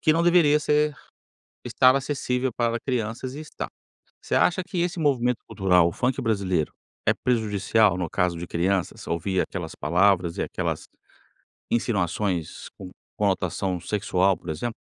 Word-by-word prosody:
que 155 - +4
não 165 - +2
deveria 170 -4 +5
ser 150 0 +2 0.7
estar 130 0 +4
acessível 130 -2 -1
para 120 -1 0
crianças 125 +1 -3
e - - -6
está. 155 - -6 0.5
Você - - -2
acha 180 +1 +3
que 185 0 -4
esse 175 0 -1
movimento 125 -5 +1
cultural, 90 -3 +3
o - - -1
funk 125 +7 -1
brasileiro, 100 -8 0 0.3
é - - +5
prejudicial, 110 -4 +2
no 90 -3 -2
caso 90 -3 0
de 85 - -5
crianças, 90 +2 -1
ouvir 90 +3 0
aquelas 90 -4 -5
palavras 90 -1 +2
e - - 0
aquelas - - -3 0.8
insinuações 95 -6 -1
com 95 -1 -9 0.3
conotação 95 -2 0
sexual, 95 -1 +1
por 85 - -10
exemplo? 115 +10 -3
105 Hz, 145 wpm, -25 LUFS, 90-130 Hz, 0.8 s, deveria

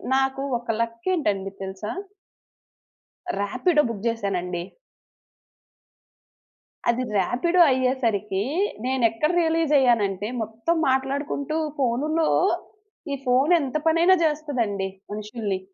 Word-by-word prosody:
నాకు 270 0 +1 0.2
ఒక 240 - -18
లక్ 230 +5 -4
ఏంటండి 200 - -1
తెలుసా? 190 +2 -5 1.5
రాపిడో 255 - +2
బుక్ 215 -2 -6
జేశానండి. 185 -6 -1 2.3
అది 240 +2 +1
రాపిడో 335 - +1
అయ్యేసరికి, 235 -7 0 0.5
నేను 260 -1 0
ఎక్కడ 265 +7 0
రియలైజ్ 325 -2 +1
అయ్యానంటే, 210 -6 +2
మొత్తం 225 +10 -1
మాట్లాడుకుంటూ 280 +3 -1 0.2
ఫోనులో. 295 +6 +1 0.8
ఈ - - 0
ఫోను 260 +7 +4
ఎంత 275 +1 -2
పనైనా 335 +3 +5
జేస్తాదండి 255 -11 -1 0.2
మనుషుల్ని. 210 -2 -3
250 Hz, 90 wpm, -24 LUFS, 210-295 Hz, 2.3 s, పనైనా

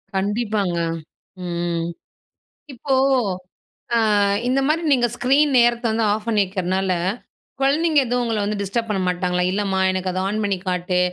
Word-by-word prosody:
கண்டிப்பாங்க. 205 -2 -1 0.7
ம். 170 -1 -2 0.9
இப்போ, 265 +2 -2 1.0
ஆ - - +4 0.5
இந்த 260 +2 +2
மாரி 315 +3 +1
நீங்க 240 -2 +3
ஸ்க்ரீன் 280 +4 +3
நேரத்த 235 0 +3
வந்து 225 +1 0
ஆஃப் 210 +1 -2
பண்ணி 215 -2 +2
வைக்குறதுனால, 185 0 -1 0.7
குழந்தைங்க 300 +2 +3
எதுவும் 245 +1 0
உங்கள 220 -3 -1
வந்து 205 0 -2
டிஸ்டர்ப் 230 +4 -2
பண்ண 195 -3 0
மாட்டாங்களா? 180 0 0
"இல்லம்மா 195 -1 -1
எனக்கு 185 0 -2
அத 185 +1 -2
ஆன் 215 +2 -1
பண்ணி 200 -2 0
காட்டு 180 0 0
205 Hz, 140 wpm, -21 LUFS, 185-240 Hz, 1.0 s, ஆ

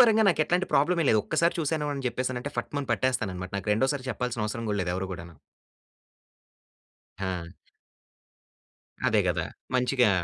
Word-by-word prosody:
పరంగా 225 -3 +7
నాకెట్లాంటి 175 +2 +2
ప్రాబ్లమే 165 +4 +3
లేదు. 110 - +5
ఒక్కసారి 170 +1 +2
చూసాను 150 -1 0
అని 135 -1 -5
జెప్పేసానంటే, 125 +1 -3
ఫట్ 120 - -3
మని 140 -2 -4
పట్టేస్తాననమాట. 105 -7 -1
నాకు 100 +2 -2
రెండోసారి 130 +3 0
చెప్పాల్సినవసరం 115 -2 -2
గూడా 105 - 0
లేదు 90 0 -1
ఎవరు 95 +1 -2
గూడాను. 85 -1 -8 1.9
ఆ! 90 -3 -3 1.6
అదే - - +4
గదా! - - 0 0.3
మంచిగా 125 -2 +4
125 Hz, 130 wpm, -28 LUFS, 105-145 Hz, 1.9 s, పరంగా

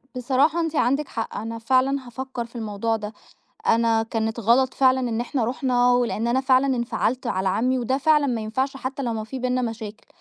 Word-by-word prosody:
بصراحة 270 +6 +2
أنتِ 325 -1 -1
عندِك 275 +3 +1
حق، 225 -1 -5
أنا 225 +2 -5
فعلًا 260 +2 +1
هافكر 255 0 -5
في 235 - -19
الموضوع 225 0 -2
ده، 210 0 -6 0.5
أنا 225 0 +3
كانت 225 0 -2
غلط 245 +4 +3
فعلًا 260 -1 +4
إن 235 -2 -1
إحنا 245 -1 -1
رُحنا 245 0 +2
ولإن 240 -2 0
أنا 255 +2 +2
فعلًا 265 0 +3
انفعلت 240 +1 -1
على 190 -4 0
عمي، 250 +7 +1
وده 260 +3 0
فعلًا 300 0 +3
ما 240 -4 -1
ينفعش 260 +6 -2
حتى 270 +1 -5
لو 235 -3 -1
ما 220 -1 -3
في 265 +4 -6
بيننا 255 0 0
مشاكل، 225 -2 -6
245 Hz, 195 wpm, -23 LUFS, 225-260 Hz, 0.5 s, فعلًا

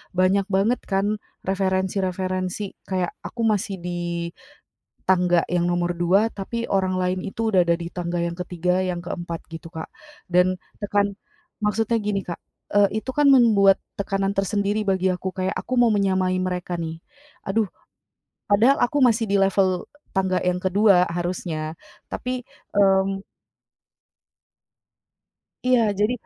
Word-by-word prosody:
banyak 185 +2 +3
banget 205 +6 +2
kan 200 +2 0 0.3
referensi-referensi 190 0 -1
kayak 185 -2 0
aku 235 - -5
masih 205 -2 0
di, 175 -1 -3 0.8
tangga 180 -2 +4
yang 175 -1 +1
nomor 175 0 0
2 195 +6 +3
tapi 230 +4 -4
orang 190 -1 +1
lain 185 0 0
itu 225 +3 -1
udah 185 -2 +5
ada 170 - +4
di 170 0 -6
tangga 175 -1 -3
yang 170 0 -2
ketiga 180 0 0
yang 180 -2 -2
keempat 170 -1 -5
gitu, 165 +1 -8
Kak. 160 -1 -7 0.4
Dan 180 +1 +4 0.3
tekan 205 0 +1 0.5
maksudnya 225 +2 +1
gini 205 -1 -1
Kak, 170 - -5 0.4
eee, 205 +1 +3
itu 260 - -4
kan 295 -1 +3
membuat 215 -7 +6 0.2
tekanan 195 0 0
tersendiri 200 +1 0
bagi 190 -1 +2
aku, 185 +1 -3
kayak 185 0 -1
aku 255 - -3
mau 235 - +5
menyamai 190 -2 +1
mereka 180 -1 -3
nih, 160 0 -5 0.4
aduh, 215 +2 +1 0.8
padahal 230 +8 +5
aku 290 +4 +1
masih 230 -2 +4
di 200 - +2
level 190 -1 +2 0.3
tangga 190 -1 +2
yang 180 0 +1
kedua 190 -1 +4
harusnya, 170 -3 -3 0.4
tapi, 255 0 -3 0.3
mmm. 195 -1 +3 2.5
Iya, 255 -1 +5 0.2
jadi 210 +4 +3
190 Hz, 135 wpm, -23 LUFS, 180-205 Hz, 2.5 s, membuat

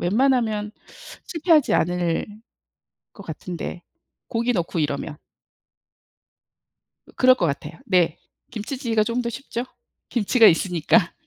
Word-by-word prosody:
웬만하면 220 0 +1 0.5
실패하지 325 -3 +2
않을 175 0 0 0.9
것 200 - -11
같은데 175 +2 -6 0.5
고기 235 +2 0
넣고 175 -4 -2
이러면. 145 0 -2 1.9
어 - - -17
그럴 255 0 +6
것 180 -9 0
같아요. 150 +3 -4
네. 180 -5 +2 0.3
김치찌개가 230 0 -1
쪼금 235 +3 -1
더 235 - -2
쉽죠, 240 -1 -5 0.4
김치가 230 0 +4
있으니까? 175 +2 +3
210 Hz, 245 characters per minute, -23 LUFS, 175-245 Hz, 1.9 s, 그럴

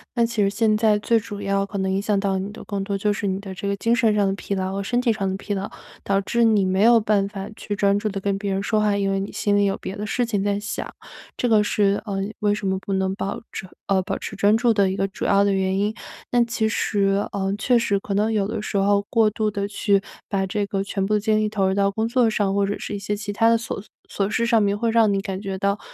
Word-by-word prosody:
那 235 -1 +3
其 230 -2 0
实 195 - +3
现 215 +1 +2
在 215 -1 +3
最 230 +2 +2
主 210 -2 -5
要 195 0 0
可 200 +1 -6
能 190 0 0
影 190 +1 0
响 205 -1 +1
到 195 -1 0
你 195 +2 -4
的 215 - -10
更 200 -2 -3
多 200 0 -2
就 205 +1 +1
是 205 - -4
你 190 -1 -1
的 195 -2 -8
这 200 +2 -3
个 200 - 0
精 230 +4 +2
神 230 -4 +3
上 205 -1 +2
的 195 - 0
疲 200 - -4
劳 190 -1 -2
和 200 0 -2
身 245 +4 0
体 245 -2 +2
上 195 -2 -2
的 190 - -2
疲 205 - -4
劳， 195 0 -4 0.3
导 195 0 +1
致 235 +4 +1
你 215 -4 +4
没 190 +2 +2
有 235 0 +7
办 210 -2 +1
法 195 -2 -6
去 205 - -5
专 200 0 +2
注 215 +1 -1
地 195 -1 -4
跟 195 0 -1
别 200 0 -3
人 195 0 0
说 215 +1 +1
话， 210 -1 +2
因 200 -1 0
为 195 - 0
你 195 - -5
心 205 -1 0
里 205 - +3
有 195 -1 +1
别 190 - -6
的 210 - -4
事 245 +3 0
情 205 -4 -1
在 200 0 0
想， 205 0 -5 0.4
这 245 - 0
个 220 -3 +4
是， 200 -1 +1
呃， 200 -3 -3 0.2
为 205 -1 +2
什 205 -1 -3
么 190 0 0
不 195 - -7
能 190 0 0
保 200 0 -3
持 - - -5 0.2
呃， 195 -1 +2
保 185 - -3
持 - - -6
专 205 +2 +3
注 235 0 +3
的 200 -3 +2
一 190 - -4
个 195 - +1
主 195 - -8
要 200 0 +4
的 200 - +2
原 190 0 0
因。 210 +2 0 0.3
但 240 -1 +3
其 230 -2 0
实， 200 -2 +1
呃， 195 -1 -1
确 240 +3 +3
实 205 -4 +1
可 200 - -5
能 210 +3 +1
有 205 -2 +1
的 220 +1 -3
时 210 - -5
候 200 +1 +3
过 225 -2 +4
度 215 0 -1
地 200 -1 -2
去 200 -1 +1 0.3
把 195 -1 0
这 205 +1 -1
个 195 -1 -2
全 195 0 -2
部 210 - 0
的 210 - +3
精 215 0 +2
力 215 - +1
投 205 -2 0
入 190 - +2
到 200 0 +2
工 220 +3 -1
作 240 -1 +3
上， 205 -3 0
或 200 0 +2
者 200 +1 -2
是 - - -6
一 205 - -3
些 205 +1 -2
其 205 0 -5
它 225 +3 +2
的 230 - +4
琐 225 -3 -5 0.3
琐 200 0 -1
事 230 +2 0
上 230 -2 +3
面 200 0 +1
会 230 +2 0
让 225 -2 +4
你 195 - +1
感 195 -1 -5
觉 195 -2 -4
到， 200 +1 0
200 Hz, 315 characters per minute, -23 LUFS, 195-215 Hz, 0.4 s, 有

